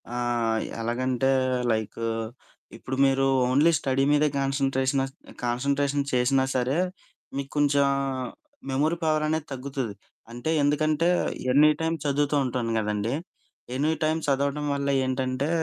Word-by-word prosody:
ఆహ్, 120 -2 0 0.2
ఎలాగంటే 125 +3 0 0.4
లైకు 110 +1 -2 0.7
ఇప్పుడు 130 - -5
మీరు 135 0 +2 0.2
ఓన్లీ 145 +6 +4
స్టడీ 135 -1 0
మీదే 150 +1 +4
కాన్స‌న్‌ట్రేషనస్ 135 0 0 0.3
కాన్స‌న్‌ట్రేషన్ 140 +3 0
చేసినా 130 +2 +3
సరే 130 +4 +1 0.6
మీకు 140 0 -4
కొంచెం 145 -1 +3 0.9
మెమరీ 155 +5 +1
పవర్ 155 -1 +2
అనేది 155 0 -1
తగ్గుతది. 135 -4 -4 0.4
అంటే 120 +6 -4
ఎందుకంటే 155 +3 +2 0.5
ఎనీటైమ్ 155 +3 +4
చదువుతూ 145 +1 +1
ఉంటాను 120 -2 -2
కదండీ, 105 +3 -1 0.6
ఎనీటైమ్ 155 +3 +1
చదవడం 140 +1 0
వల్ల 140 0 -1 0.2
ఏంటంటే, 130 +2 -1
135 Hz, 105 wpm, -26 LUFS, 130-145 Hz, 0.9 s, ఓన్లీ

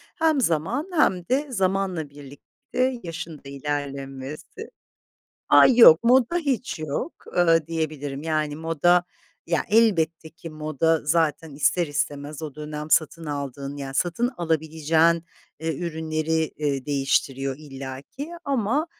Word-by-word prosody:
Hem 320 -4 +2
zaman 215 - 0
hem 185 - +2
de 285 +3 +1
zamanla 190 - -1
birlikte 145 - -4
yaşın 165 -2 -6
da 140 - -13
ilerlemesi. 140 - -5 0.8
Ay, 255 - +7
yok, 185 -4 +9
moda 255 +6 +4
hiç 265 - -1
yok, 155 - -3 0.2
ııı, 165 -3 +4
diyebilirim, 150 -4 -3
yani, 155 -2 -1
moda, 165 +2 +2 0.4
ya, 170 -1 0
elbette 170 -8 +2
ki 170 0 -10
moda 155 +1 0
zaten 160 -1 0
ister 170 +4 +2
istemez 145 +1 -3
o 150 -3 -6
dönem 150 0 -6
satın 165 +1 +2
aldığın, 140 -1 -5
yani, 135 -1 -6
satın 175 - +1
alabileceğin, 160 0 +1 0.4
ııı, 160 0 0
ürünleri, 160 0 -2
ııı, 140 -3 -1
değiştiriyor 135 -1 0
illaki. 140 - -8
Ama, 275 +3 0
160 Hz, 120 wpm, -24 LUFS, 145-180 Hz, 0.8 s, yok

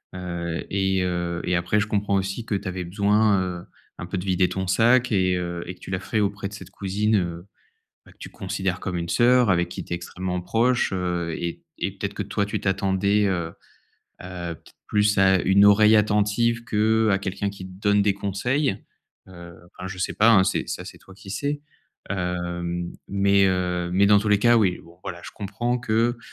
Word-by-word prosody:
Heu 85 -2 -4
et 95 -1 +1
heu, 85 -1 -2
et 90 - +1
après 90 +5 +1
je 105 - -1
comprends 100 -1 -1
aussi 95 +4 -3
que 110 - -3
tu 100 0 -4
avais 90 -1 -3
besoin, 100 +2 +2
heu, 90 -1 -4 0.3
un 85 - -5
peu 95 +1 -4
de 90 - -6
vider 90 -1 +2
ton 95 0 -3
sac 120 +5 +3
et 95 -2 +2
heu 85 -1 -4
et 90 - -5
que - - -27
tu - - -11
l'as 95 - 0
la 95 - -10
fait 110 - -1
auprès 100 0 -1
de 100 - -11
cette 105 - -10
cousine, 105 +3 0
heu, 85 0 -3 0.6
bah, - - -17
que - - -36
tu - - -9
considères 95 -1 -3
comme 90 -2 -4
une 85 0 -4
sœur 125 -1 +4
avec 85 -1 +2
qui - - -6
tu - - -16
es - - +1
extrêmement 90 +1 -4
proche, 120 +7 +1
heu 90 -2 -2
et 85 -1 -5 0.2
et - - -1
peut-être - - -4
que - - -3
toi 100 - -1
tu 105 - -4
t'attendais, 100 +1 +1
heu 85 -3 -1 0.8
heu, 90 -2 -6
peut - - -23
être - - -24
plus 105 0 +2
à 95 -1 +4
une 95 +2 +5
oreille 105 +2 +6
attentive 105 +3 +2
qu'à 110 -2 +2
quelqu'un 100 +1 -3
qui 95 -2 -9
te - - -12
donne 105 0 +3
des 100 0 +2
conseils. 100 +5 -1 0.4
Heu, 85 -2 -12 0.2
enfin 90 - -8
je 95 - -7
sais - - -1
pas, 115 +2 +5
hein, 95 -4 +6
c'est, - - -1
ça - - -5
c'est - - -10
toi 95 - -16
qui 95 0 -13
sais. 145 +8 -2 0.5
Hem, 85 -2 -3 0.2
mais, 100 0 +3
heu, 90 -2 0
mais 100 +2 +4
dans 105 0 +6
tous 105 +1 -2
les 105 -1 +4
cas, 120 +1 +5
oui, 95 -5 +2
bon, 85 +1 -18
voilà, 85 - -6
je - - -8
comprends 120 +5 -2
que, 115 0 0
95 Hz, 215 wpm, -24 LUFS, 90-105 Hz, 0.8 s, oreille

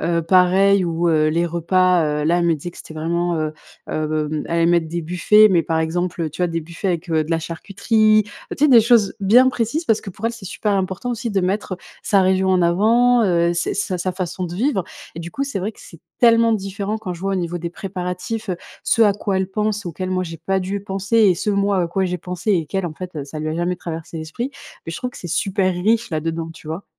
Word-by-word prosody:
heu, 170 -1 0
pareil 185 +2 +4
où, 170 0 0
heu, 155 -1 +3
les 170 +2 +1
repas, 175 +1 +2 0.2
heu, - - -2
là 170 +2 +3
elle 175 - +1
me 165 - +3
disait 165 +4 -6
que - - -17
c'était 160 - -11
vraiment, 170 +2 -1
heu, 155 -1 -2 0.4
hem 155 0 -2
elle - - -10
allait 170 0 +3
mettre 170 -2 +2
des 170 +1 -3
buffets, 180 +6 +5
mais 170 -3 +3
par 160 +1 -1
exemple, 175 +2 -1
heu, 155 - -2
tu 165 +4 -4
vois, - - +3
des 165 0 -2
buffets 170 +5 -5
avec, 175 -1 -2
heu, 160 -1 +2
de 160 - -9
la 165 - +2
charcuterie, 215 +6 +1
tu 205 - -14 0.3
sais - - +5
des 240 -4 +8
choses 225 -3 +3
bien 240 +7 +6
précises 250 +7 -1
parce 220 -2 +2
que 195 - -8
pour 210 +5 -4
elle 230 - -1
c'est 230 -4 -11
super 205 +2 -2
important 190 +5 -2
aussi 230 -1 -3
de 195 -1 +1
mettre 185 0 -2 0.3
sa 200 -3 +3
région 190 0 +2
en 185 -1 +3
avant, 230 +7 +4
heu, 170 -2 +2
s 175 0 -1
sa 190 -2 -2
sa 185 +1 -1
façon 185 0 -4
de 175 0 -5
vivre 225 -2 0 0.3
et 165 - -6
du 170 +1 -7
coup 275 +9 -2
c'est 275 -8 -4
vrai 205 +4 -2
que - - -24
c'est 165 - -14 0.2
tellement 230 -1 +5
différent 200 +1 -2
quand 190 -5 -5
je 170 - -12
vois 195 0 -1
au - - +1
niveau 175 -1 -2
des 170 0 -4
préparatifs, 185 +4 -5
heu, 180 - -1 0.3
ce 230 - +3
à 205 -2 +5
quoi 200 -1 -2
elle 190 0 -1
pense 210 -1 -1
auquel 185 +3 -4
moi 185 0 0
j'ai 165 -1 -8
pas 190 +4 -1
dû 195 +2 -3
penser 195 +3 -1
et 200 -5 +5
ce 210 - -1
moi 200 -1 +1
à - - 0
quoi 190 +3 0
j'ai 180 -1 -2
pensé 180 +5 -2
et 165 -5 +1
qu'elle 190 +2 -2
en 155 - -6
fait, 180 -1 -8
heu, 145 -2 -4
ça 145 +2 -8
lui 155 +1 -3
a 155 - -2
jamais 175 +1 -1
traversé 165 -1 -7
l'esprit, 160 - -4 0.4
beh, 165 - -6
je - - -5
trouve 250 -1 -4
que - - -12
c'est 175 - -7
super 190 +2 0
riche 225 +4 +1
là-dedans, 165 +1 -3
tu 160 - -15
vois? 165 +5 -5
185 Hz, 260 wpm, -20 LUFS, 170-205 Hz, 0.4 s, des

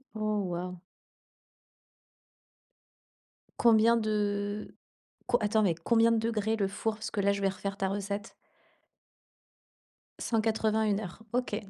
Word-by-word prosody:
Oh, 215 -1 0
waouh! 180 +1 -4 2.8
Combien 230 0 +5
de 205 -1 -1 0.5
co 240 - +3
attends 215 +1 +2
mais 185 -5 +3
combien 230 +7 +3
de 230 - +3
degrés, 220 -1 0
le 200 -3 0
four? 210 +2 -2
Parce 220 - -6
que 205 - -2
là, 200 0 +3
je 200 - -4
vais 195 - +3
refaire 195 +1 -5
ta 195 -1 -1
recette. 200 +1 -4 1.9
180, 220 -1 +1
1 205 -1 +1
heure. 195 -2 -7
OK, 250 -3 0
210 Hz, 125 wpm, -30 LUFS, 200-220 Hz, 2.8 s, Combien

